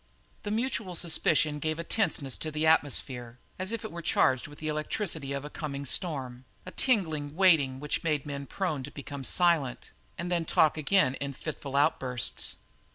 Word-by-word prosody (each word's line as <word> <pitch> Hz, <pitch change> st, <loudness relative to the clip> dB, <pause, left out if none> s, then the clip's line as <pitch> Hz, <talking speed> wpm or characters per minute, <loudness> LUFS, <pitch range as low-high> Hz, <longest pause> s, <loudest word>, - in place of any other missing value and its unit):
The 205 Hz, -, -4 dB
mutual 220 Hz, -4 st, -1 dB
suspicion 155 Hz, -3 st, +2 dB
gave 155 Hz, +1 st, -1 dB
a 170 Hz, -, -3 dB
tenseness 165 Hz, -, 0 dB
to 160 Hz, -, -2 dB
the 155 Hz, +1 st, -1 dB
atmosphere, 130 Hz, -6 st, +2 dB, 0.2 s
as 190 Hz, +2 st, -2 dB
if 230 Hz, -2 st, -3 dB
it -, -, -5 dB
were 170 Hz, -, -6 dB
charged 130 Hz, -5 st, +2 dB
with 145 Hz, 0 st, -12 dB
the 155 Hz, -, -5 dB
electricity 155 Hz, -1 st, -2 dB
of 140 Hz, 0 st, -3 dB
a -, -, -6 dB
coming 140 Hz, -3 st, -5 dB
storm, 130 Hz, -5 st, -2 dB, 0.2 s
a 185 Hz, -, -7 dB
tingling 160 Hz, -, 0 dB
waiting 160 Hz, -8 st, +4 dB
which 150 Hz, +1 st, -2 dB
made 150 Hz, -4 st, +1 dB
the -, -, -8 dB
men 140 Hz, -1 st, -5 dB
prone 165 Hz, -6 st, -2 dB
to 135 Hz, -, -7 dB
become 140 Hz, -1 st, -7 dB
silent 160 Hz, -5 st, +2 dB, 0.3 s
and 175 Hz, +1 st, -4 dB
then 170 Hz, -1 st, +2 dB
talk 155 Hz, -1 st, +3 dB
again 155 Hz, -2 st, +3 dB
in 140 Hz, 0 st, -4 dB
fitful 140 Hz, -1 st, -6 dB
outbursts. 130 Hz, -4 st, +1 dB
150 Hz, 180 wpm, -29 LUFS, 140-170 Hz, 0.3 s, waiting